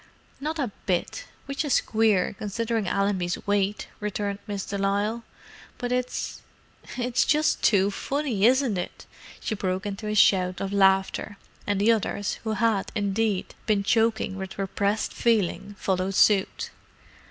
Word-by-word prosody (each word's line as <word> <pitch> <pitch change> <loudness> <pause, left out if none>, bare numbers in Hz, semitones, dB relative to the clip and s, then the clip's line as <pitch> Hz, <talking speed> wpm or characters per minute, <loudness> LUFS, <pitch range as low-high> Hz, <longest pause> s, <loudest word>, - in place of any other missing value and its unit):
"Not 310 +3 -3
a 260 -8 -1 0.2
bit, 190 - -1 0.2
which 275 +2 -2
is 290 -4 +3
queer, 215 -4 +2
considering 220 0 -2
Allenby's 190 -2 0
weight!" 200 0 0
returned 205 -1 -3
Miss 200 -2 -3
de 200 - -4
Lisle. 205 +4 0 0.5
"But 245 -1 -3
it's—it's 250 0 -3
just 305 +1 +2
t - - +5
too 200 -2 +3
funny, 270 -2 -2
isn't 255 -6 +2
it!" 175 - -6 0.3
She - - -3
broke 190 -1 -2
into 205 +1 -4
a 210 - -1
shout 185 -3 +4
of 195 0 -3
laughter, 195 +1 +2 0.3
and 205 -1 +1
the 215 +3 +5
others, 205 -2 -1
who 220 -1 -1
had, 220 -3 +1
indeed, 205 -1 0
been 205 -2 +2
choking 220 -2 +1
with 190 -1 -6
repressed 200 +2 -1
feeling, 205 -3 0
followed 190 0 -1
suit. 200 -1 +3
205 Hz, 140 wpm, -26 LUFS, 195-230 Hz, 0.5 s, t